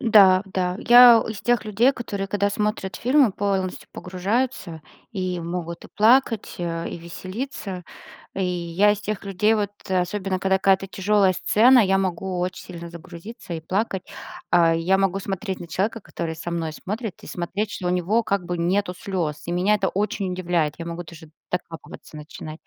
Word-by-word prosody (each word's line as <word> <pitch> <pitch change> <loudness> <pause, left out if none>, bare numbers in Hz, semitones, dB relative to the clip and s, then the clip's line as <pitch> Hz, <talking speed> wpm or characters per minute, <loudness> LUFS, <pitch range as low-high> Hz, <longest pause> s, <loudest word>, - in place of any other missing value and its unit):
Да, 195 -5 +6
да. 185 -1 -2
Я 240 -1 +8
из 215 -2 -5
тех 240 -1 +1
людей, 220 +6 +3
которые, 205 -6 -4
когда 200 +1 0
смотрят 205 -3 -2
фильмы, 260 -1 +3
полностью 195 -2 -2
погружаются 185 -2 -2 0.3
и 185 -3 -2
могут 170 0 -5
и - - -11
плакать, 230 0 +3
э, 165 -1 -3
и - - -6
веселиться. 185 - -6 0.5
И 190 - -1
я 180 +3 +2
из 210 - -5
тех 210 -1 -4
людей, 200 +3 +2
вот 205 -2 -1 0.2
особенно, 185 +1 -1
когда 190 0 +2
какая-то 195 0 +3
тяжелая 195 0 +2
сцена, 245 +7 +5
я 195 -2 +3
могу 185 0 -2
очень 180 +1 -3
сильно 170 -1 -8
загрузиться 170 +3 -9
и 165 - -4
плакать. 190 +3 -2 0.5
А. 165 -1 +5
Я 180 +4 +2
могу 195 0 +1
смотреть 195 0 -4
на 170 - -8
человека, 210 +7 -1
который 165 -4 -5
со 170 +2 -6
мной 165 -2 -2
смотрит, 210 +5 -6
и - - -11
смотреть, 195 +4 -3
что 180 - -5
у - - +1
него 180 +6 +1
как 200 -3 -1
бы 175 0 -3
нету 180 +2 0
слез, 170 -7 -3
и 170 - -3
меня 185 +4 +2
это 195 -2 0
очень 200 -1 -2
удивляет, 170 -4 0
я 165 - -6
могу 170 +1 -5
даже 160 -1 -13 0.2
докапываться 165 -3 -6
начинать. 155 +1 -9
190 Hz, 175 wpm, -23 LUFS, 175-210 Hz, 0.5 s, Я